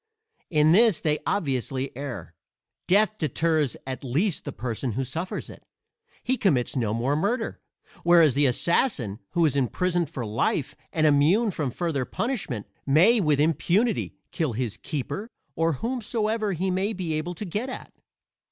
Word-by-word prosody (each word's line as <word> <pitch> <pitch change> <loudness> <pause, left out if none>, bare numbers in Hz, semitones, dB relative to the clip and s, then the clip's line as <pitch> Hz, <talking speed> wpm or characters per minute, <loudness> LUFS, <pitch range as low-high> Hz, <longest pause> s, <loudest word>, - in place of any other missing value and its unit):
In 155 -2 +4
this 215 0 +5
they 150 -1 0
obviously 135 - -1
err: 120 - -6 0.5
death 215 +3 +3
deters 155 -1 +1
at 130 0 -5
least 150 - 0
the - - -4
person 120 0 -3
who 135 +5 -1
suffers 160 +8 -4
it - - -12 0.6
he 260 +1 0
commits 145 - +1
no 115 -5 0
more 120 +6 0
murder; 225 +9 -1 0.4
whereas 170 -5 +5
the 140 +2 +3
assassin 125 - +1
who 170 -1 +3
is 145 - +1
imprisoned 170 +5 0
for 130 -7 -5
life 115 +6 -1 0.2
and 155 -1 +1
immune 160 +10 +4
from 150 -6 -2
further 150 0 -2
punishment 190 - -3 0.2
may 180 - +5
with 150 -5 +2
impunity 170 - +1 0.2
kill 155 -8 -1
his 115 -2 -2
keeper 170 - -5 0.3
or 165 0 +1
whomsoever 220 - -1
he 185 +2 -1
may 195 +4 0
be 180 -5 -3
able 160 +3 -3
to 210 - -5
get 210 +8 -3
at. - - -8
160 Hz, 150 wpm, -26 LUFS, 135-195 Hz, 0.6 s, this